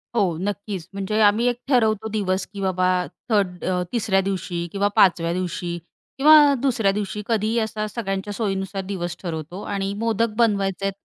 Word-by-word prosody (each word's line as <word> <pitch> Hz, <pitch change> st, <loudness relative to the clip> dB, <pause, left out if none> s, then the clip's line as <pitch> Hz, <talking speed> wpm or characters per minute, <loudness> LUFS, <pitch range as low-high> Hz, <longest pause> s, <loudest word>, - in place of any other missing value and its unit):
हो, 185 Hz, -8 st, +1 dB
नक्कीच. 200 Hz, -3 st, -4 dB
म्हणजे 200 Hz, +2 st, -2 dB
आम्ही 210 Hz, +3 st, +4 dB
1 245 Hz, -1 st, +1 dB
ठरवतो 220 Hz, -5 st, +2 dB
दिवस, 190 Hz, -3 st, -1 dB
की 200 Hz, -, -6 dB
बाबा 185 Hz, -1 st, +1 dB, 0.4 s
थर्ड 195 Hz, -5 st, 0 dB
अ, 180 Hz, -1 st, 0 dB
3ऱ्या 210 Hz, -5 st, +1 dB
दिवशी 185 Hz, -3 st, -3 dB
किंवा, 200 Hz, 0 st, +1 dB
5व्या 170 Hz, -2 st, +4 dB
दिवशी 175 Hz, -1 st, -3 dB, 0.4 s
किंवा, 295 Hz, 0 st, +7 dB
2ऱ्या 230 Hz, -7 st, +2 dB
दिवशी 210 Hz, +1 st, -3 dB
कधीही 225 Hz, 0 st, 0 dB
असा 220 Hz, -1 st, -2 dB
सगळ्यांच्या 200 Hz, -2 st, -4 dB
सोयीनुसार 195 Hz, -2 st, -2 dB
दिवस 175 Hz, -3 st, -4 dB
ठरवतो 170 Hz, +2 st, -5 dB
आणि 200 Hz, -1 st, -3 dB
मोदक 225 Hz, +1 st, 0 dB
बनवायचेत 195 Hz, -3 st, +1 dB
200 Hz, 150 wpm, -23 LUFS, 185-220 Hz, 0.4 s, किंवा